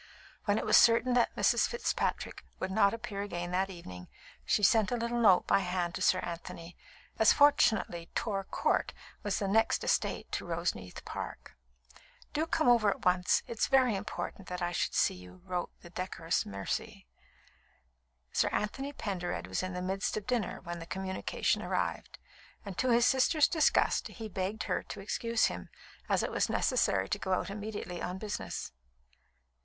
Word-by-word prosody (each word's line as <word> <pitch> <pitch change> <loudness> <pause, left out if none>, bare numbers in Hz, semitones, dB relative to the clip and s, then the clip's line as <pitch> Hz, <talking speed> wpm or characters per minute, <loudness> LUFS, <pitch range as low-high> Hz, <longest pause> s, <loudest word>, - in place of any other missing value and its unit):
When 205 0 +2
it - - -2
was - - +6
certain 235 +2 +5
that 245 -1 +2
Mrs. - - +3
Fitzpatrick 475 - -2 0.2
would 190 - -3
not 200 0 +4
appear 230 -3 -5
again 175 -3 -4
that 190 +2 +1
evening, 90 - -9 0.4
she 210 - +1
sent 220 +1 +4
a 245 - +1
little 235 +1 -1
note 190 -5 +6
by - - +4
hand 180 -2 -2
to - - -5
Sir 185 - +4
Anthony, 170 0 -7 0.4
as 220 - +7
fortunately 220 -12 +3
Torr 195 -3 -1
Count - - 0 0.3
was 205 -1 -1
the 200 - -1
next 225 +3 +2
estate - - 0
to - - -2
Roseneath 165 - -4
Park. - - -7 0.8
"Do 315 +2 0
come 315 -3 +1
over 235 -4 +5
at 195 - -3
once. 180 0 +3
It 230 - -8
is - - +3
very 255 -5 +4
important 195 -1 -5
that 180 0 -4
I 175 -1 -1
should - - -1
see - - +3
you," 90 0 -13
wrote 180 -1 -2
the 175 - -13
decorous 175 -2 -2
Mercy. 100 -9 -4 1.3
Sir - - +3
Anthony 270 +7 -2
Pendered 190 -9 -3
was - - -2
in 185 0 -4
the 180 0 -4
midst 195 +3 -1
of 210 - -4
dinner 235 -6 -1
when 175 0 -6
the 165 - -9
communication 190 0 -1
arrived, - - -2 0.5
and 200 -2 -6
to 260 - +2
his 235 0 +5
sister's 280 +3 +4
disgust 315 -2 +2
he 225 -2 -8
begged 195 +2 -3
her - - -1
to - - -9
excuse 230 +3 0
him, 90 0 -4 0.4
as - - +2
it - - -2
was - - +1
necessary 95 0 +1
to - - -2
go 190 - -1
out 190 - -1
immediately 205 -4 -5
on 180 +1 -3
business. 210 +1 -5
195 Hz, 175 wpm, -31 LUFS, 175-225 Hz, 1.3 s, as